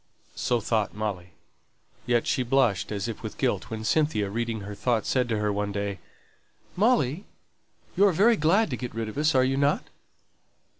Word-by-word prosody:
So 120 Hz, -, 0 dB
thought 110 Hz, -2 st, -1 dB
Molly. 100 Hz, -4 st, -4 dB, 0.7 s
Yet 120 Hz, -1 st, +2 dB
she -, -, 0 dB
blushed, 125 Hz, -6 st, +1 dB
as 100 Hz, +1 st, -2 dB
if 115 Hz, -, -6 dB
with -, -, -7 dB
guilt, -, -, -1 dB
when 110 Hz, -1 st, -5 dB
Cynthia, 110 Hz, -7 st, +1 dB
reading 115 Hz, 0 st, -2 dB
her 100 Hz, +1 st, -7 dB
thoughts, 115 Hz, +1 st, -1 dB
said 125 Hz, -2 st, +1 dB
to 110 Hz, -, 0 dB
her 105 Hz, -1 st, 0 dB
one 100 Hz, 0 st, -2 dB
day, 100 Hz, -2 st, -3 dB, 0.8 s
"Molly, 195 Hz, -, +2 dB, 0.7 s
you're 200 Hz, +1 st, +5 dB
very 210 Hz, +8 st, +4 dB
glad 180 Hz, +3 st, +2 dB
to 125 Hz, -, -2 dB
get 125 Hz, -3 st, -6 dB
rid 115 Hz, -1 st, -3 dB
of 110 Hz, -, -9 dB
us, 155 Hz, 0 st, +2 dB
are 130 Hz, 0 st, +5 dB
not 140 Hz, +2 st, +1 dB
you?" -, -, -26 dB
120 Hz, 180 wpm, -26 LUFS, 105-145 Hz, 0.8 s, you're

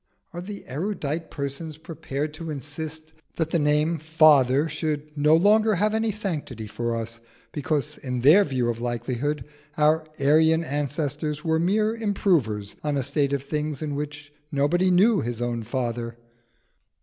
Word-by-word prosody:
Are 175 Hz, -, -5 dB
these 200 Hz, +2 st, -8 dB
erudite 160 Hz, 0 st, -3 dB
persons 145 Hz, +2 st, -5 dB
prepared 150 Hz, -2 st, -5 dB
to 165 Hz, +1 st, -7 dB
insist 155 Hz, +2 st, -6 dB, 0.2 s
that 160 Hz, -1 st, -1 dB
the 170 Hz, -, +2 dB
name 150 Hz, +2 st, +2 dB
"Father" 150 Hz, -3 st, +5 dB
should 155 Hz, -1 st, -3 dB
no 150 Hz, +1 st, +4 dB
longer 215 Hz, +5 st, +4 dB
have 210 Hz, +4 st, +1 dB
any 220 Hz, 0 st, +1 dB
sanctity 160 Hz, -, -4 dB
for 120 Hz, +2 st, -3 dB
us, 115 Hz, 0 st, -5 dB, 0.3 s
because 150 Hz, 0 st, -2 dB
in 125 Hz, -2 st, -3 dB
their 155 Hz, +11 st, +7 dB
view 130 Hz, -8 st, -1 dB
of 115 Hz, 0 st, -2 dB
likelihood 120 Hz, +4 st, -2 dB, 0.3 s
our 155 Hz, +1 st, +3 dB
Aryan 160 Hz, +3 st, +4 dB
ancestors 150 Hz, +1 st, -2 dB
were 160 Hz, -1 st, +1 dB
mere 210 Hz, +6 st, +2 dB
improvers 170 Hz, -, 0 dB
on 150 Hz, -1 st, 0 dB
a 135 Hz, -, 0 dB
state 140 Hz, +1 st, 0 dB
of 140 Hz, -1 st, -1 dB
things 150 Hz, 0 st, -3 dB
in 150 Hz, -2 st, -3 dB
which 145 Hz, 0 st, -6 dB, 0.2 s
nobody 160 Hz, +6 st, +2 dB
knew 195 Hz, +4 st, +4 dB
his 120 Hz, 0 st, -3 dB
own 120 Hz, -1 st, -2 dB
father? 120 Hz, 0 st, -3 dB
150 Hz, 150 wpm, -25 LUFS, 135-165 Hz, 0.3 s, their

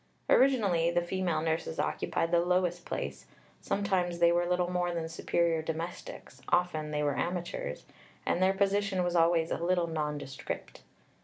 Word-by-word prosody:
Originally 205 Hz, -11 st, +4 dB
the 175 Hz, 0 st, +1 dB
female 175 Hz, -3 st, -1 dB
nurses 160 Hz, 0 st, -2 dB
occupied 165 Hz, 0 st, -1 dB
the 170 Hz, -, +5 dB
lowest 175 Hz, 0 st, 0 dB
place; -, -, -4 dB, 0.3 s
sometimes 190 Hz, -4 st, 0 dB
they 170 Hz, 0 st, +5 dB
were 175 Hz, 0 st, +2 dB
little 180 Hz, 0 st, +1 dB
more 180 Hz, -1 st, 0 dB
than 165 Hz, -1 st, -2 dB
superior 165 Hz, 0 st, 0 dB
domestics, 165 Hz, +2 st, -6 dB
often 175 Hz, -4 st, +1 dB
they 150 Hz, 0 st, -1 dB
were 145 Hz, -3 st, 0 dB
amateurs, 175 Hz, -, -3 dB, 0.4 s
and 175 Hz, -, 0 dB
their 190 Hz, +1 st, +5 dB
position 200 Hz, -1 st, +1 dB
was 175 Hz, 0 st, -1 dB
always 165 Hz, -1 st, +3 dB
a -, -, -1 dB
little 175 Hz, 0 st, +2 dB
nondescript. 150 Hz, -4 st, -5 dB
175 Hz, 150 wpm, -30 LUFS, 165-180 Hz, 0.4 s, the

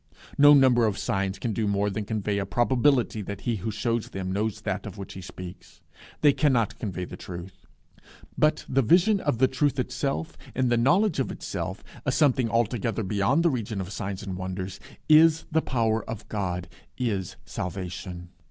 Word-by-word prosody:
No 145 Hz, +1 st, +8 dB
number 125 Hz, -4 st, +5 dB
of 105 Hz, -, -1 dB
signs 95 Hz, 0 st, -1 dB
can 110 Hz, +3 st, -2 dB
do 110 Hz, +1 st, -1 dB
more 100 Hz, 0 st, +1 dB
than 105 Hz, +1 st, -3 dB
convey 105 Hz, -1 st, -1 dB
a 100 Hz, -, -1 dB
probability 120 Hz, +1 st, +2 dB
that 100 Hz, 0 st, -6 dB
he 115 Hz, -2 st, -1 dB
who 100 Hz, +4 st, -4 dB
shews 115 Hz, +1 st, -1 dB
them 95 Hz, -1 st, -4 dB
knows 105 Hz, +2 st, -1 dB
that -, -, -3 dB
of -, -, -9 dB
which 100 Hz, -, -7 dB
he 95 Hz, -, -8 dB
speaks. 90 Hz, 0 st, -10 dB, 0.4 s
They 145 Hz, -2 st, +6 dB
cannot 130 Hz, -9 st, +1 dB
convey 90 Hz, -4 st, -3 dB
the -, -, -9 dB
truth. 90 Hz, +1 st, -9 dB, 0.7 s
But 155 Hz, 0 st, +2 dB
the 135 Hz, -, +2 dB
vision 180 Hz, -, +4 dB
of 145 Hz, -9 st, 0 dB
the 130 Hz, +2 st, +4 dB
truth 140 Hz, +1 st, 0 dB
itself, 135 Hz, +4 st, -2 dB, 0.2 s
in 130 Hz, -1 st, +2 dB
the 120 Hz, -, +3 dB
knowledge 175 Hz, -, +3 dB
of 135 Hz, -, 0 dB
itself, 95 Hz, +2 st, -5 dB, 0.2 s
a 135 Hz, -, 0 dB
something 130 Hz, -4 st, +3 dB
altogether 115 Hz, -1 st, 0 dB
beyond 105 Hz, -, +2 dB
the 170 Hz, -, +4 dB
region 110 Hz, -5 st, -3 dB
of 95 Hz, 0 st, -5 dB
signs 100 Hz, 0 st, -4 dB
and 95 Hz, -2 st, -4 dB
wonders, 95 Hz, 0 st, -5 dB, 0.3 s
is 160 Hz, +1 st, +6 dB
the 160 Hz, +1 st, +3 dB
power 115 Hz, -5 st, 0 dB
of 110 Hz, -1 st, -6 dB
God, 90 Hz, -4 st, -2 dB, 0.3 s
is 100 Hz, -7 st, -2 dB
salvation. 90 Hz, -1 st, -5 dB
110 Hz, 180 wpm, -26 LUFS, 95-130 Hz, 0.7 s, No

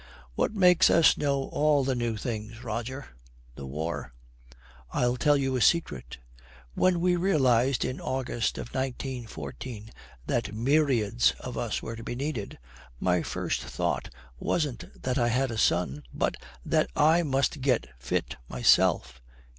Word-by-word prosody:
'What -, -, 0 dB
makes 180 Hz, -3 st, +6 dB
us 165 Hz, -1 st, +6 dB
know 140 Hz, -2 st, 0 dB
all 150 Hz, -2 st, +2 dB
the 135 Hz, 0 st, 0 dB
new 120 Hz, -3 st, -1 dB
things, 110 Hz, +1 st, -5 dB
Roger? 120 Hz, +4 st, -5 dB, 0.4 s
the 65 Hz, +2 st, -8 dB
war. 75 Hz, -1 st, -4 dB, 0.8 s
I'll 125 Hz, 0 st, +1 dB
tell 145 Hz, +3 st, +3 dB
you 135 Hz, -1 st, 0 dB
a 125 Hz, -, 0 dB
secret. 165 Hz, -, +1 dB, 0.6 s
When 185 Hz, -2 st, +2 dB
we 180 Hz, 0 st, +3 dB
realised 135 Hz, -8 st, +2 dB
in 130 Hz, +1 st, -4 dB
August 130 Hz, -3 st, -2 dB
of -, -, -6 dB
1914 120 Hz, -, -5 dB, 0.3 s
that 105 Hz, -, -1 dB
myriads 115 Hz, -, +2 dB
of -, -, -7 dB
us -, -, -2 dB
were 115 Hz, -, -5 dB
to 115 Hz, -, -9 dB
be 120 Hz, -, -4 dB
needed, 130 Hz, -6 st, -4 dB, 0.4 s
my 90 Hz, -1 st, +2 dB
first -, -, -2 dB
thought -, -, -2 dB, 0.3 s
wasn't 145 Hz, -8 st, -3 dB
that 130 Hz, 0 st, 0 dB
I 120 Hz, -, +3 dB
had 130 Hz, +2 st, +1 dB
a 115 Hz, -, -4 dB
son, 75 Hz, -8 st, +1 dB
but -, -, -1 dB, 0.3 s
that -, -, +2 dB
I 160 Hz, +3 st, +5 dB
must 140 Hz, -1 st, 0 dB
get 130 Hz, -, +2 dB
fit -, -, -2 dB
myself.' 60 Hz, +1 st, +3 dB
125 Hz, 145 wpm, -28 LUFS, 110-140 Hz, 0.8 s, makes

